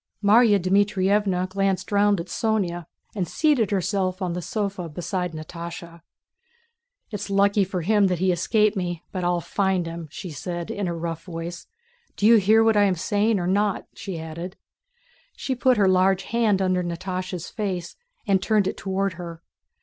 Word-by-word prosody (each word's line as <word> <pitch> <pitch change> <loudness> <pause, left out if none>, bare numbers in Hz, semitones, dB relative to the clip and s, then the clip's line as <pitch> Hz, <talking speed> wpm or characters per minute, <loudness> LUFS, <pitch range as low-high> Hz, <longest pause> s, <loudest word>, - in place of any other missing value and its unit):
Márya 210 0 +5
Dmítrievna 195 0 +2
glanced 195 +1 -1
round 205 -1 +3
at 170 - -4
Sónya 185 -5 -1 0.3
and 185 -5 -2
seated 275 - +2
herself 190 -1 -1
on 180 -3 -2
the 180 - -3
sofa 195 -3 -3
beside 175 +2 -3
Natásha. 170 +1 -8 1.1
"It's 205 -1 -5
lucky 200 +1 +3
for 185 -1 -3
him 205 +3 +3
that 180 -1 0
he 185 +2 +2
escaped 210 +5 +2
me; 175 -3 -3
but 185 -2 -3
I'll 175 0 +1
find 190 -1 0
him!" 165 -1 -6
she 170 +3 -7
said 175 +3 -5
in 200 -2 -2
her 170 -1 -3
rough 165 -1 -4
voice. 170 0 -6 0.5
"Do 205 - -1
you 230 +1 +8
hear 215 +2 +5
what 225 -1 +3
I 205 0 +5
am 190 -2 +2
saying 205 +4 +1
or 175 - -2
not?" 200 +2 +1
she 195 -6 -6
added. 165 +3 -7 0.8
She 265 - -3
put 255 -1 +2
her 200 -2 +4
large 185 +1 +3
hand 215 -4 +1
under 185 -1 +1
Natásha's 180 0 -4
face 185 -5 -4 0.3
and 195 -3 +2
turned 205 0 +2
it - - -3
toward 195 0 -1
her. 170 -2 -9
190 Hz, 170 wpm, -24 LUFS, 175-205 Hz, 1.1 s, you